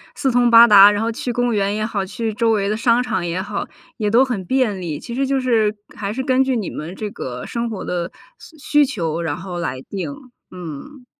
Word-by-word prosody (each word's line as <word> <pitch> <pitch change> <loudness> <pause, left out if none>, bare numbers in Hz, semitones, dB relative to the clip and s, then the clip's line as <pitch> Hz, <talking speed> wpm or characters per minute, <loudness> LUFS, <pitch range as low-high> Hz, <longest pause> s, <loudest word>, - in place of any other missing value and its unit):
四 270 - 0
通 245 0 +3
八 230 +1 +9
达， 205 -2 +9
然 205 0 -1
后 230 +1 0
去 245 +1 -4
公 245 0 0
园 200 -1 0
也 215 - -2
好， 205 -3 -2
去 225 +3 -3
周 225 +2 +1
围 200 -2 +1
的 215 - -1
商 235 +1 +3
场 215 -8 -2
也 175 +2 -2
好， 200 +1 -4 0.3
也 210 -1 0
都 245 +3 +5
很 235 -8 -3
便 230 -3 0
利。 165 -5 -4
其 235 - -7
实 270 +2 0
就 270 0 0
是 225 -4 +1 0.2
还 205 0 -4
是 260 - -3
根 260 -1 +3
据 265 -1 0
你 215 -5 -2
们 165 +5 -7
这 210 +1 -5
个 125 -9 -7
生 235 0 -3
活 215 -4 -5
的 175 -1 -3 0.3
需 320 - -16 0.3
需 - - +3
求， 165 - -3
然 160 -3 -2
后 180 +1 -7
来 130 -6 -4
定， 195 - -5 0.4
嗯。 180 - -9
215 Hz, 250 characters per minute, -20 LUFS, 185-245 Hz, 0.4 s, 八